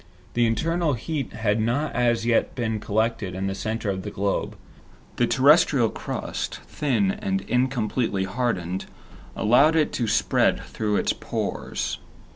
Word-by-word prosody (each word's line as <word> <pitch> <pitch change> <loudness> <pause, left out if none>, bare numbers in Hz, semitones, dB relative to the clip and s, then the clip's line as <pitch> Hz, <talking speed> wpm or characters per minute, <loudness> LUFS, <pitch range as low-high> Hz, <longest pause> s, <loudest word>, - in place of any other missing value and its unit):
The 120 -1 +3
internal 165 +6 +1
heat 140 +3 -3
had 110 -1 0
not 130 +7 0
as 120 -1 +1
yet 120 -1 +1
been 110 -3 -1
collected 110 -3 -1
in 95 +1 -3
the 95 - -1
center 110 +3 -3
of 95 -1 -3
the - - -5
globe. 100 0 -2 0.6
The 120 - +3
terrestrial 140 -3 +5
crust, - - -4
thin 150 +7 0
and 195 -1 -2
incompletely 125 - 0
hardened, 95 -4 -2 0.5
allowed 140 +9 +4
it 155 -2 +2
to 120 - -1
spread - - +2
through 105 -1 -2
its - - +1
pores. - - -3
115 Hz, 140 wpm, -24 LUFS, 105-140 Hz, 0.6 s, terrestrial